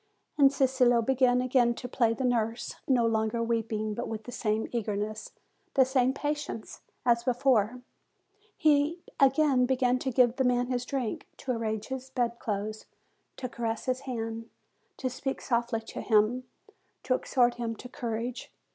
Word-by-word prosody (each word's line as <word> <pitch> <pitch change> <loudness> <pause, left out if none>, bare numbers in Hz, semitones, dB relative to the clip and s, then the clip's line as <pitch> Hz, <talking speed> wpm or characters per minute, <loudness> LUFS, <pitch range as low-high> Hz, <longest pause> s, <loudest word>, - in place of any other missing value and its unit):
And 275 -2 +6
Cicillo 255 -3 +3
began 250 0 +3
again 245 -2 +3
to 245 - -6
play 230 -2 +1
the 265 - -3
nurse, 235 -1 0
no 250 -3 +3
longer 220 +1 +1
weeping, 225 -2 -1
but - - -4
with 220 -1 -5
the 245 - -8
same 220 -2 -1
eagerness, 215 -2 -3 0.4
the 265 -2 +6
same 260 -1 +2
patience, 290 -4 -4 0.2
as 235 -1 +3
before; 245 -2 +2 0.7
he 305 -1 +3 0.2
again 270 -2 +4
began 255 -1 +2
to 265 - -2
give 245 -1 +3
the 265 - +2
man 245 0 +2
his 250 0 -1
drink, 255 -4 -3
to 265 - -3
arrange 220 -2 -2
his 265 0 -5
bed 240 -2 -1
clothes, 215 0 -4 0.5
to 255 - -3
caress 230 -2 -3
his 255 -1 0
hand, 230 -4 -5 0.5
to 260 - -2
speak 260 +1 -3
softly 235 -2 0
to 225 - -7
him, 225 +3 +2 0.6
to 255 - +1
exhort 245 -1 +2
him 230 -1 -3
to 250 - -10
courage. 240 +1 -4
245 Hz, 155 wpm, -29 LUFS, 225-260 Hz, 0.7 s, And